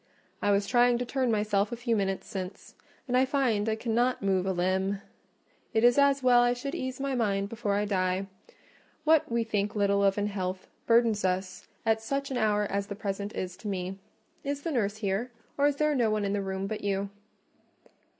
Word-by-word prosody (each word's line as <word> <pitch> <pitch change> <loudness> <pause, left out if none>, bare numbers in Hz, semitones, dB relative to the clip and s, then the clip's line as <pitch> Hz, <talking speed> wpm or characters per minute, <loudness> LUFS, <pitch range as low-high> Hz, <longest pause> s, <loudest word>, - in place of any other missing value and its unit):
"I - - +1
was 200 0 +3
trying 245 +2 +4
to 250 - -2
turn 260 0 0
myself 210 0 +1
a - - -2
few 235 -1 0
minutes 195 -2 -1
since, 185 -1 -7 0.3
and 255 +1 +2
find 235 -7 +1
I 220 - +1
cannot 240 +1 0
move 190 -1 +1
a - - +2
limb. 190 +2 0 0.8
It 220 - +3
is 245 +3 +6
as 280 -1 +4
well 245 -1 +6
I 245 0 +3
should 260 +3 -5
ease 260 0 -4
my 275 0 -1
mind 200 -5 0
before 215 -3 -1
I 205 +1 +1
die: 185 -1 0 0.8
what 315 -5 +3
we 235 0 +1
think 210 -1 -1
little 200 -1 +2
of 195 0 +3
in 205 - +1
health, 190 -2 -3 0.2
burdens 230 -2 +4
us 185 0 -2 0.2
at 220 0 +2
such 275 +4 -3
an 260 - -1
hour 210 -2 +2
as 200 0 -2
the 200 - -5
present 200 0 -4
is 180 -1 -4
to 220 - -8
me. 190 -1 -3 0.4
Is 285 0 -3
the 330 - -2
nurse 215 -6 0
here? 210 +3 -1 0.3
or 285 0 +3
is 290 - +1
there 300 +1 +2
no 240 -5 +2
one 215 -1 0
in 200 - -1
the 205 - 0
room 190 0 -3
but 215 +1 -4
you?" 200 0 -1
210 Hz, 205 wpm, -28 LUFS, 195-245 Hz, 0.8 s, is